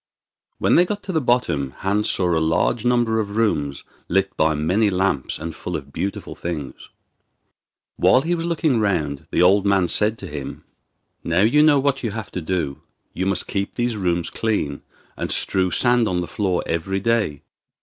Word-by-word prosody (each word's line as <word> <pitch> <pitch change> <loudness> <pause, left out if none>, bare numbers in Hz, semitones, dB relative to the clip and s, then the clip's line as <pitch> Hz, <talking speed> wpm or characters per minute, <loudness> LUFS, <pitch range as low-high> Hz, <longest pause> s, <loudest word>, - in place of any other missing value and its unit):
When - - +3
they 175 - +7
got 205 +3 -4
to 190 - -4
the 160 -3 +1
bottom 85 - 0
Hans 100 +2 0
saw 90 -2 +1
a - - +2
large 80 +8 +1
number 120 -2 +2
of 100 -1 -3
rooms 70 -11 0 0.3
lit 95 +2 +1
by 80 0 +2
many 90 +8 +2
lamps 95 -8 0
and 80 +1 -6
full - - -4
of 70 0 -12
beautiful 100 +1 -4
things. 80 -5 -6 1.1
While 130 - +4
he 170 +2 0
was 170 -1 -2
looking 155 -7 +1
round 80 -10 -1
the - - +2
old 95 +2 +5
man 100 -3 +3
said 110 +5 +1
to - - -8
him: 75 -2 -7 0.6
'Now 85 +2 +1
you 120 +8 +4
know 150 -2 +6
what 140 0 +1
you 115 - -2
have 110 0 -6
to 90 - -4
do. 80 -5 -2 0.3
You 95 - -2
must 100 - -1
keep 100 0 -3
these 120 -1 -1
rooms 90 -4 -1
clean, 100 -11 -1 0.3
and - - -4
strew 95 -1 +1
sand 120 +3 +2
on 90 -3 0
the 90 - -4
floor 90 +1 -1
every 90 +4 -1
day. 105 -9 0
95 Hz, 185 wpm, -22 LUFS, 85-115 Hz, 1.1 s, they